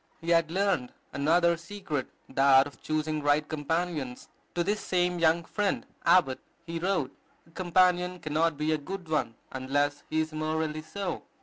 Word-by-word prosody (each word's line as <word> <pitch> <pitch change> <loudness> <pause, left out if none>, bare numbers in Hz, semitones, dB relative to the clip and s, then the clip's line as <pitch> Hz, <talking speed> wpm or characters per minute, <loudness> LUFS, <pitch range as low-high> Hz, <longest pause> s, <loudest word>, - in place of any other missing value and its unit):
He 170 +1 -2
had 165 -1 +4
learned 185 -8 0 0.2
another 170 +4 +3
secret, 170 -5 -4 0.2
that 135 0 +5
of 145 - -11
choosing 155 0 -1
right 145 +1 +2
companions. 155 -4 -2 0.3
To 175 - +2
this 205 +4 0
same 180 -1 0
young 165 +1 +3
friend, 205 +4 -1 0.2
Abbott, 150 -8 +4 0.3
he 165 0 -4
wrote, 170 -7 -1 0.3
"A 165 - -22
companion 180 0 +2
cannot 155 -1 0
be 155 +1 0
a 155 - +1
good 185 +4 -7
one, 155 -7 -1 0.2
unless 145 +2 0
he 155 - 0
is 160 0 -1
morally 155 0 -1
so. 180 +4 -4
160 Hz, 160 wpm, -29 LUFS, 145-175 Hz, 0.3 s, that